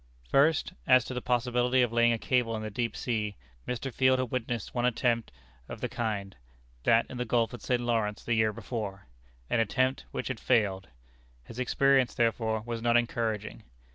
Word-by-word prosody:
First, 155 - +3
as 125 -2 +6
to - - -5
the 125 - -3
possibility 125 +1 +2
of 120 -1 -1
laying 120 0 +4
a 115 - +1
cable 120 -1 0
in 110 - -4
the 110 - -5
deep 115 +3 -2
sea, 105 -4 -2 0.3
Mr. 125 +1 -3
Field 130 0 +4
had 130 -2 -2
witnessed 120 -3 -3
one 120 - -1
attempt 120 -1 +1 0.4
of - - -7
the - - -2
kind 105 -4 -3 0.5
that 115 - +4
in 125 - -8
the 125 - -1
Gulf 115 0 +1
of 120 - -8
St. 125 -1 0
Lawrence 110 -3 -1
the 120 - 0
year 110 -1 +3
before 105 -3 -5 0.4
an - - +1
attempt 130 +4 +1
which - - -4
had 125 -4 -4
failed. 100 -6 +1 0.6
His 110 - -10
experience, 135 0 +3
therefore, 110 -1 +1
was 115 0 -5
not 120 0 +4
encouraging. 115 -3 -2
120 Hz, 185 wpm, -29 LUFS, 110-125 Hz, 0.6 s, as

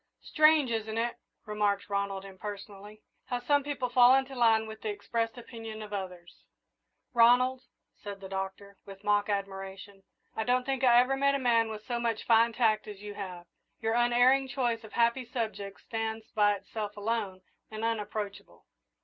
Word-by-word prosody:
"Strange, 305 -4 +4
isn't 220 -1 -2
it," 235 +1 -1 0.3
remarked 205 -1 0
Ronald, 200 -1 -2
impersonally, 205 +1 -9 0.2
"how 245 - -2
some 285 +3 +2
people 280 -3 -2
fall 245 +1 +6
into 270 0 0
line 225 -3 +3
with 220 0 -9
the 220 - -3
expressed 225 +3 -2
opinions 225 -2 -8
of 210 -1 -9
others!" 180 -3 -7 0.7
"Ronald," 250 +2 +5 0.4
said 200 -1 -7
the 195 - -8
Doctor, 195 +1 -6
with 195 0 -12
mock 205 0 +2
admiration, 195 0 -5 0.3
"I 220 - -1
don't 250 +2 +1
think 270 -1 -2
I 240 -2 +7
ever 255 +2 +2
met 280 +1 +2
a - - 0
man 230 -3 +3
with 215 -1 -7
so 240 -1 -2
much 230 -2 -1
fine 230 0 +4
tact 220 -3 +2
as 205 -1 -9
you 205 0 -6
have. 185 -4 -7 0.3
Your 225 0 0
unerring 245 +3 +4
choice 245 -3 -1
of 220 - -12
happy 235 +2 +2
subjects 220 -5 -5
stands 225 -1 -4
by 205 -1 +3
itself 210 +1 -6
alone 205 -3 -2 0.3
and 220 +1 -4
unapproachable." 210 -2 -4
220 Hz, 165 wpm, -30 LUFS, 205-240 Hz, 0.7 s, I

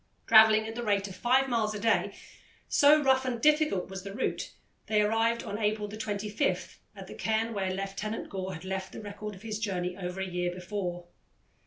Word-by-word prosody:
Travelling 220 -1 +7
at 220 - -5
the 240 - -4
rate 205 -3 +1
of 185 - -9
five 255 +6 +3
miles 220 -4 0
a - - -4
day, 225 +2 +1 0.5
so 295 +1 +5
rough 265 -1 +4
and 250 -2 -2
difficult 300 - +3
was 190 0 -7
the 195 +1 -7
route, 260 - -2 0.4
they 215 -1 +2
arrived 225 +2 +1
on 205 - -5
April 210 -1 0
25 210 +3 -2 0.2
at - - -9
the - - -10
cairn 225 +1 -1
where 190 -2 -1
Lieutenant 195 +3 -4
Gore 190 -1 -5
had 165 - -10
left 190 0 -4
the - - -7
record 210 0 -7
of 190 - -15
his 215 -2 -4
journey 180 -4 -2
over 180 0 -5
a 190 - -1
year 180 -1 -2
before. 180 -1 -4
210 Hz, 195 wpm, -29 LUFS, 190-225 Hz, 0.5 s, Travelling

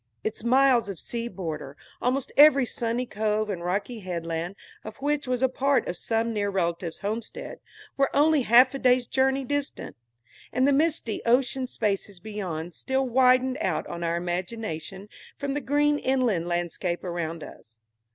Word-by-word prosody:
Its 220 0 -4
miles 250 -2 +4
of 195 - -5
sea 235 +7 -4
border, 155 - -6 0.2
almost 255 +2 0
every 280 -2 +7
sunny 235 +1 -2
cove 215 -1 -1
and 175 -3 -5
rocky 200 +6 -2
headland 170 -1 -4 0.3
of 215 0 -9
which 290 0 -1
was 250 0 0
a - - +6
part 270 +1 +1
of 175 - -2
some 225 +4 -1
near 205 -1 0
relative's 170 -3 -2
homestead, 215 +3 -5 0.4
were 275 -1 +3
only 300 0 +4
half 250 +2 +6
a 275 - -4
day's 250 -1 +3
journey 265 +1 +1
distant; 285 +2 -3 0.6
and 255 +3 +2
the 285 - +4
misty 295 -7 0
ocean 255 +2 +2
spaces 200 -4 -2
beyond 175 -5 -5
still 265 +8 -1
widened 255 +2 +3
out - - -1
on 170 0 -6
our 170 0 0
imagination 180 +1 -4 0.3
from 280 -1 -3
the 290 - -2
green 290 +3 +2
inland 245 -10 +1
landscape 175 0 -2
around 170 -3 -4
us. 115 0 -13
230 Hz, 160 wpm, -26 LUFS, 180-265 Hz, 0.6 s, every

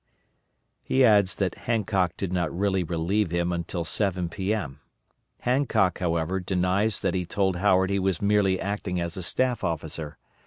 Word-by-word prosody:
He 130 0 +3
adds 100 -5 +4
that 95 -2 -1 0.2
Hancock 100 -6 +1
did 95 -2 -3
not 85 -3 0
really 95 0 0
relieve 85 +4 0
him 85 +1 0
until 85 0 -3
7 90 0 -1
P.M. 95 -7 -3 0.6
Hancock, 120 -8 +1
however, 85 +1 0
denies 95 +3 0
that 95 -3 0
he 90 - 0
told 95 +1 0
Howard 95 0 +3
he 100 - +1
was 95 -2 0
merely 100 -2 +2
acting 100 -2 -3
as 85 -1 -3
a 95 - -4
staff 125 +7 0
officer. 80 -2 -4
95 Hz, 155 wpm, -26 LUFS, 85-100 Hz, 0.6 s, adds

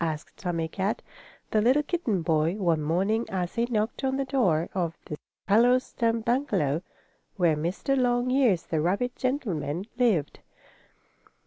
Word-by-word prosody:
asked 155 -1 -4
Tommie 170 -3 -2
Kat, 195 +5 -2 0.5
the 215 - +3
little 260 +7 +4
kitten 245 - -1
boy, 160 +2 +1
one 170 -6 +1
morning 190 +9 +1
as 180 -2 -2
he 235 0 +1
knocked 220 +2 -2
on 265 0 0
the 275 - -1
door 185 - +1
of 170 -4 -2
the 150 - -5 0.3
hollow 235 +5 +5
stump 230 -3 -1
bungalow, 200 - +1 0.5
where 170 -5 +3
Mr. 175 - -1
Longears, 245 -5 +2
the 160 -2 -1
rabbit 200 +9 0
gentleman, 195 - -2
lived. 195 - +1
200 Hz, 140 wpm, -27 LUFS, 165-245 Hz, 0.5 s, hollow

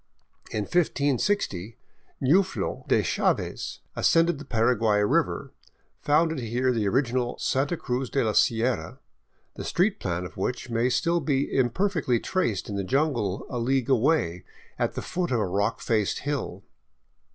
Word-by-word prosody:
In 110 - -2
1560 140 - 0 0.4
Nuflo 185 +8 +1
de - - +3
Chaves, - - -1
ascending 165 -1 +3
the 150 - -9
Paraguay 115 -3 +2
river, 105 - 0 0.5
founded 160 +1 +2
here 125 +2 0
the 110 -4 0
original 125 +1 0
Santa 140 +6 0
Cruz 125 -2 -2
de 140 - +1
la 110 - +1
Sierra, 115 -5 +1 0.6
the - - -5
street 190 +4 +1
plan 90 -1 -2
of - - -10
which 120 +5 -3
may 115 +2 +2
still 170 +6 +1
be 140 -3 -1
imperfectly 135 - +1
traced 120 - -1
in 100 - -4
the 100 - -1
jungle 120 -5 0
a 125 - -4
league 130 +1 0
away 115 - +2 0.4
at - - 0
the - - -4
foot 180 -1 -2
of 120 - +1
a 105 - +1
rock 100 +5 -1
faced 110 -4 0
hill. 145 -3 -3
125 Hz, 145 wpm, -26 LUFS, 110-150 Hz, 0.6 s, de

